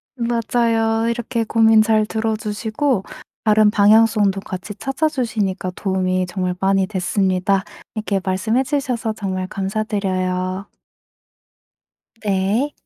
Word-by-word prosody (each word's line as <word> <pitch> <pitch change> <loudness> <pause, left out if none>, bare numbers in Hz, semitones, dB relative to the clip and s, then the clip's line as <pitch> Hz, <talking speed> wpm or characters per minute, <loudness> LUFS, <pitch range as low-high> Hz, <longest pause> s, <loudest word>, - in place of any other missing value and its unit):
맞아요. 230 -1 +1
이렇게 235 0 -2
고민 225 0 +4
잘 215 -1 +3
들어 220 0 -1
주시고 215 +2 -1 0.4
다른 215 -1 +5
방향성도 210 -1 +4
같이 185 +2 -6
찾아 270 +8 -1
주시니까 215 -9 -2
도움이 185 -1 0
정말 180 0 -2
많이 195 -1 +2
됐습니다. 190 0 0 0.3
이렇게 210 -2 -1
말씀해 205 +7 0
주셔서 255 -5 -1
정말 185 -3 -3
감사드려요. 190 -2 -2 1.6
네. 205 +8 +1
210 Hz, 260 characters per minute, -20 LUFS, 190-225 Hz, 1.6 s, 다른